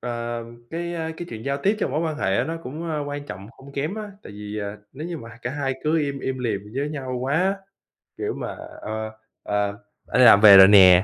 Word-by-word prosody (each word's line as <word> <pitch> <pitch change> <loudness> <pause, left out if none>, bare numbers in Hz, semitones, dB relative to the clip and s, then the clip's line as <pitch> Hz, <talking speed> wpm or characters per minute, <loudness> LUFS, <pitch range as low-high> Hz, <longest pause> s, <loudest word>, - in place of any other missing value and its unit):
ờ, 120 -1 -4 0.3
cái, 170 +1 -4
a, 160 -1 -3
cái 175 - -6
chuyện 110 0 -7
giao 140 0 0
tiếp 205 +3 +2
trong - - -1
mối 150 +4 0
quan 160 -2 -2
hệ 95 -9 +1
á - - +2
nó 165 +1 -3
cũng, 160 +5 -6
a, 155 - -1
quan 145 0 -5
trọng 95 -2 -8
hông 140 +1 -15
kém 145 +7 -2
á. 215 -1 -6
Tại - - -11
vì, 105 +1 -6
ờ, 100 0 -4 0.2
nếu 150 +5 -6
như 175 - -4
mà 115 -4 -10
h 115 - -12
cả 125 - -2
hai 140 -1 -2
cứ 160 +2 +2
im 140 -2 -2
im 130 0 -3
lìm 115 -5 -1
với 140 +2 -1
nhau 130 -4 -4
quá, 170 +9 +1 0.6
kiểu 420 0 -2
mà, - - -5 0.3
ờ, 110 0 -4 0.3
ờ 105 0 0 0.4
"Anh - - 0
đi - - +8
làm 100 -3 +8
về 100 -2 +10
rồi 95 0 +10
nè." 95 -2 +8
135 Hz, 250 wpm, -23 LUFS, 110-155 Hz, 0.6 s, về